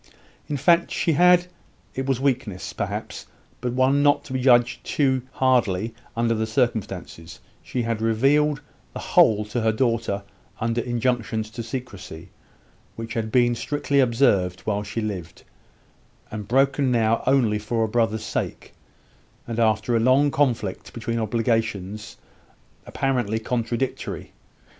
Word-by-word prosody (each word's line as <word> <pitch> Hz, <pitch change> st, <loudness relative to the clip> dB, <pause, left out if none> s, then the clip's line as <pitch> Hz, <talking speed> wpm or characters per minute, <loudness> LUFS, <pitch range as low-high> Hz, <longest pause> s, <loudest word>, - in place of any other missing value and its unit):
In 145 Hz, -, -2 dB
fact 170 Hz, +4 st, +3 dB
she 170 Hz, -, 0 dB
had 180 Hz, +3 st, +5 dB, 0.5 s
it 130 Hz, 0 st, -3 dB
was 135 Hz, -3 st, +1 dB
weakness, 130 Hz, -8 st, -2 dB
perhaps, -, -, -5 dB, 0.3 s
but 125 Hz, 0 st, -2 dB
one 130 Hz, +2 st, +3 dB
not 145 Hz, 0 st, +3 dB
to 130 Hz, -, -8 dB
be 130 Hz, -, -1 dB, 0.4 s
too 130 Hz, -3 st, +1 dB
hardly 115 Hz, -6 st, +2 dB
judged 115 Hz, -, -24 dB
under 115 Hz, 0 st, +1 dB
the 110 Hz, 0 st, -1 dB
circumstances 110 Hz, -8 st, -2 dB, 0.2 s
she 125 Hz, -, -3 dB
had 115 Hz, -1 st, -2 dB
revealed 135 Hz, +6 st, +2 dB, 0.3 s
the -, -, -6 dB
whole 105 Hz, -1 st, +4 dB
to 115 Hz, +3 st, -3 dB
her 110 Hz, 0 st, +3 dB
daughter 115 Hz, -4 st, 0 dB, 0.4 s
under 115 Hz, +1 st, 0 dB
injunctions 115 Hz, -3 st, -1 dB
to 115 Hz, -, -6 dB
secrecy, 105 Hz, -8 st, -7 dB, 0.7 s
which 115 Hz, 0 st, -6 dB
had 110 Hz, -1 st, -2 dB
been 120 Hz, 0 st, +4 dB
strictly 140 Hz, +3 st, -1 dB
observed 110 Hz, -8 st, +2 dB
while 105 Hz, -1 st, -1 dB
she 105 Hz, +2 st, -4 dB
lived, 90 Hz, -6 st, -6 dB, 0.9 s
and 105 Hz, -2 st, -6 dB
broken 135 Hz, +2 st, +2 dB
now 115 Hz, -1 st, +2 dB
only 120 Hz, -6 st, +3 dB
for 115 Hz, +2 st, -1 dB
a -, -, +1 dB
brother's 110 Hz, -1 st, 0 dB
sake, -, -, -4 dB, 0.7 s
and 115 Hz, -1 st, -4 dB
after 110 Hz, +1 st, +2 dB
a -, -, +3 dB
long 130 Hz, +5 st, +4 dB
conflict 120 Hz, -9 st, -1 dB
between 115 Hz, 0 st, -3 dB
obligations 110 Hz, -2 st, -2 dB, 0.7 s
apparently 125 Hz, -5 st, -1 dB
contradictory. 120 Hz, +2 st, -3 dB
115 Hz, 135 wpm, -24 LUFS, 110-130 Hz, 0.9 s, had